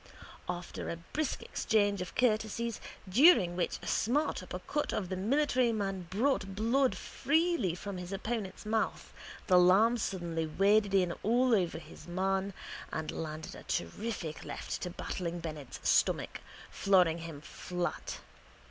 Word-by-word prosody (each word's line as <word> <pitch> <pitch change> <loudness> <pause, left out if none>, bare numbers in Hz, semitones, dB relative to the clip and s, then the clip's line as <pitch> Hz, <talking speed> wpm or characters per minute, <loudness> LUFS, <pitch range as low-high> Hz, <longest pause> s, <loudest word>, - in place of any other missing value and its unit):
After 175 0 -4
a - - -2
brisk 270 - -3
exchange 205 -3 +1
of 180 - -6
courtesies 230 -1 0 0.3
during 195 - +6
which 175 - -1
a - - -7
smart 285 +3 +1
upper 180 0 -6
cut 295 +11 -2
of 190 -4 -2
the 190 - -2
military 250 +4 +2
man 195 -4 -2
brought 200 -2 0
blood 245 +5 +2
freely 315 - +1
from 195 +1 -6
his 180 +1 -7
opponent's 210 0 -4
mouth 220 +1 -1 0.3
the 180 -2 +6
lamb 210 +7 +5
suddenly 170 -5 -2
waded 200 +4 +3
in 180 -3 +3
all 245 +3 +3
over 180 -7 +2
his 160 0 -12
man 190 +2 -1 0.4
and 160 0 -3
landed 155 0 -5
a - - -10
terrific 200 -8 -3
left - - -5
to 180 - -3
Battling 175 0 -4
Bennett's 155 -5 -6
stomach, - - +2 0.3
flooring 180 -4 +3
him 165 -3 -7
flat. 175 +3 -4
195 Hz, 140 wpm, -32 LUFS, 175-225 Hz, 0.4 s, during